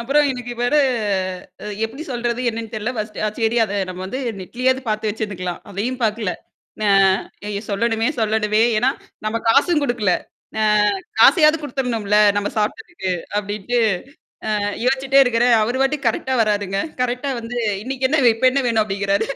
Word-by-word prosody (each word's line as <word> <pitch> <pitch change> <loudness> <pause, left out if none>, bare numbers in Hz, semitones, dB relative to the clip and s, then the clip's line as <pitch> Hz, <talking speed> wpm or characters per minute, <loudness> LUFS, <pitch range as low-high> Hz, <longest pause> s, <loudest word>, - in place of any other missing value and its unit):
அப்புறம் 285 +5 +3
எனக்கு 245 -1 -6
வேற 245 +5 +1 0.9
அ - - -6 0.2
எப்பிடி 255 +8 -6
சொல்றது 240 0 -2
என்னன்னு 225 0 -6
தெரியல 220 +4 -2
ஃபர்ஸ்ட் 215 0 -5
அ - - +1
சரி 225 0 +1
அத 205 -1 -5
நம்ம 185 0 -6
வந்து 255 +7 -4 0.2
நெட்லயாவது 255 +7 0
பார்த்து 215 0 -1
வச்சிருந்துருங்கலாம். 195 -5 -4
அதையும் 235 +7 -3
பாக்கல. 215 -3 0 0.5
ந - - -1 0.6
ஐயோ! 205 -1 -3
சொல்லணுமே! 225 +3 +1
சொல்லணுமே! 215 0 +2 0.2
ஏன்னா 255 +3 +3 0.4
நம்ம 215 - -1
காசும் 295 +6 +4
குடுக்கல. 240 -8 +1 0.5
அ - - +2 0.6
காசையாவது 310 -2 +6
குடுத்தர்ணும்ல 240 -7 -1 0.2
நம்ம 205 0 0
சாப்டதுக்கு. 240 - -3 0.3
அப்பிடின்ட்டு 210 +3 -2 0.8
அ 210 - 0 0.3
யோசிச்சுட்டே 270 +1 +4
இருக்கிறேன். 240 0 +3
அவரு 250 +4 -1
பாட்டுக்கு 270 -1 0
கரெக்ட்டா 260 +3 -2
வராருங்க. 205 -2 -1 0.2
கரெக்ட்டா 250 +3 -2
வந்து 240 +2 -6 0.3
இன்னக்கி 260 +1 -1
என்ன, 310 -1 +2
இப்ப 255 +3 +3
என்ன 275 0 0
வேணும்? 225 -2 +2
அப்பிடிங்கிறாரு 200 +1 0
230 Hz, 150 wpm, -20 LUFS, 210-260 Hz, 0.9 s, காசையாவது